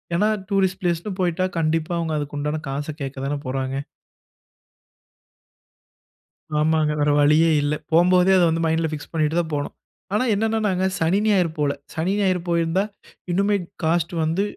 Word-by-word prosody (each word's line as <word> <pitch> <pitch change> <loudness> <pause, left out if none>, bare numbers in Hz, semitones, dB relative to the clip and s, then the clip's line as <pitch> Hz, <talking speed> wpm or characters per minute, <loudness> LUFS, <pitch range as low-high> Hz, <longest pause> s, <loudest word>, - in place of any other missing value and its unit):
ஏனா 205 +5 +3 0.2
டூரிஸ்ட் 190 -2 +1
பிளேஸ்னு 175 +2 -1
போய்ட்டா 180 0 +1
கண்டிப்பா 160 0 0
அவங்க 165 -2 -2
அதுக்குண்டான 145 +1 -3
காச 140 +2 -3
கேட்க 135 0 -4
தானே 145 +1 -1
போறாங்க. 130 +1 -2 2.8
ஆமாங்க 155 0 +2
வேற 145 0 +2
வழியே 155 +3 +5
இல்ல. 145 +1 0 0.2
போம்போதே 180 +3 +5
அத 180 - +4
வந்து 165 +1 0
மைண்ட்ல 160 0 +1
பிக்ஸ் 150 -1 -7
பண்ணிட்டு 155 0 0
தான் 165 -2 -2
போணும். 145 -1 -2 0.4
ஆனா, 210 - +2
என்னன்னனாங்க 210 -3 0 0.2
சனி, 165 +5 +2
ஞாயிறு 190 -5 +3
போகல. 145 -1 +1 0.2
சனி, 170 +5 -1
ஞாயிறு 185 -3 +1
போயிருந்தா 170 +2 +1 0.5
இன்னுமே 200 +3 +2 0.3
காஸ்ட் 170 +2 +1
வந்து 165 +5 0
165 Hz, 140 wpm, -22 LUFS, 150-185 Hz, 2.8 s, வழியே